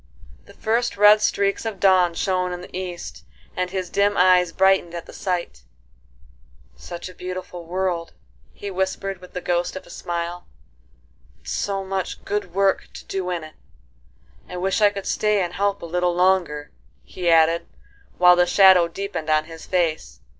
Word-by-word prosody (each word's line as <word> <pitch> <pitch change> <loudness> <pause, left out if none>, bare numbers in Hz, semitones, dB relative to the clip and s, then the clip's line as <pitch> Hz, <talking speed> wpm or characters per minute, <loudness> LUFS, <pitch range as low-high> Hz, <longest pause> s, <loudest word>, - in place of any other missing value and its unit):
The - - -17
first 230 -1 -1
red 210 +1 +7
streaks 200 -1 +1
of 220 -4 -5
dawn 185 -3 +4
shone 185 -1 0
in 180 - -6
the 180 - -11
east, 180 -2 -6 0.3
and 180 0 -1
his 185 -2 -4
dim 200 0 +2
eyes 180 -1 +5
brightened 190 -2 +2
at 170 - -6
the - - -13
sight; 175 - -3 1.1
"Such 175 - -8
a 185 - -11
beautiful 180 -1 -7
world!" 180 -2 -2 0.4
he 200 - -7
whispered 190 0 -3
with 180 - -14
the 180 - -4
ghost 175 0 -1
of 185 - -7
a - - -14
smile, 175 +1 -5 0.9
"and - - -22
so 195 -1 -2
much 190 -1 -4
good 205 -3 -2
work 195 0 +2
to - - -10
do 190 -2 -3
in 175 -3 -3
it, 155 0 -11 1.0
I 180 - -6
wish 190 +4 0
I 205 - +7
could 200 -1 -7
stay 210 -1 +1
and 175 0 -4
help 200 +1 -1
a - - -4
little 175 +1 0
longer," 175 -5 +1 0.3
he 180 -2 -3
added, 165 0 +4 0.5
while 180 0 +7
the 180 0 +3
shadow 190 -3 +6
deepened 170 -3 -5
on 155 0 +3
his 165 0 -11
face. 170 -4 -1
180 Hz, 170 wpm, -22 LUFS, 175-195 Hz, 1.1 s, red